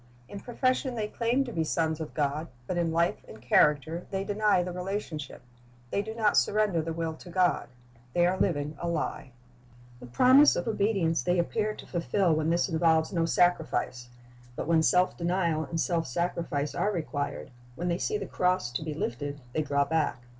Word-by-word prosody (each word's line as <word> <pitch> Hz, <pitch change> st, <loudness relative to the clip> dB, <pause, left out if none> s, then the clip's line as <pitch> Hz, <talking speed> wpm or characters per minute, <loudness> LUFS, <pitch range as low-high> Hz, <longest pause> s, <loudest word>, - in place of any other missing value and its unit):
In 200 Hz, -, -8 dB
profession 255 Hz, +2 st, -1 dB
they 215 Hz, -2 st, -2 dB
claim 235 Hz, +5 st, 0 dB
to 240 Hz, -, -7 dB
be 165 Hz, -, 0 dB
sons 160 Hz, 0 st, -1 dB
of 160 Hz, -, -7 dB
God, 150 Hz, +2 st, -1 dB, 0.2 s
but 180 Hz, -, -3 dB
in 170 Hz, -1 st, 0 dB
life 170 Hz, +1 st, 0 dB
and 110 Hz, -, -11 dB
character 150 Hz, +7 st, +2 dB
they 195 Hz, 0 st, -2 dB
deny 205 Hz, -2 st, +2 dB
the 180 Hz, -, -4 dB
relationship. 180 Hz, -5 st, -5 dB, 0.5 s
They 200 Hz, -, +1 dB
do 220 Hz, +2 st, -7 dB
not 215 Hz, -3 st, +2 dB
surrender 205 Hz, -5 st, +2 dB
the 165 Hz, +1 st, -4 dB
will 165 Hz, 0 st, -3 dB
to 165 Hz, +3 st, -13 dB
God. 180 Hz, 0 st, +1 dB, 0.5 s
They 175 Hz, -, +3 dB
are 185 Hz, +2 st, +1 dB
living 150 Hz, -4 st, 0 dB
a 170 Hz, -, -2 dB
lie. 155 Hz, -5 st, -3 dB, 0.7 s
The 125 Hz, -, -10 dB
promise 255 Hz, -, +6 dB
of 175 Hz, -, -2 dB
obedience 200 Hz, -6 st, +1 dB
they 180 Hz, 0 st, +1 dB
appear 215 Hz, +5 st, 0 dB
to -, -, -11 dB
fulfil 175 Hz, 0 st, +1 dB
when 155 Hz, +1 st, 0 dB
this 170 Hz, +1 st, +2 dB
involves 160 Hz, 0 st, +2 dB
no 165 Hz, -2 st, +1 dB
sacrifice; 160 Hz, -8 st, +1 dB, 0.5 s
but -, -, -4 dB
when 165 Hz, -1 st, +4 dB
self 180 Hz, +3 st, +3 dB
denial 170 Hz, -2 st, 0 dB
and 165 Hz, -, -4 dB
self 165 Hz, -1 st, 0 dB
sacrifice 150 Hz, 0 st, -2 dB
are 210 Hz, -, 0 dB
required, 145 Hz, -7 st, -4 dB, 0.2 s
when 175 Hz, +6 st, -3 dB
they 170 Hz, 0 st, 0 dB
see 425 Hz, -, 0 dB
the -, -, -5 dB
cross 180 Hz, -8 st, 0 dB
to 125 Hz, -, -3 dB
be 155 Hz, -1 st, -4 dB
lifted, 145 Hz, +1 st, -4 dB
they 155 Hz, -, +1 dB
draw 140 Hz, -1 st, +1 dB
back. 155 Hz, -6 st, -1 dB
170 Hz, 190 wpm, -28 LUFS, 155-195 Hz, 0.7 s, promise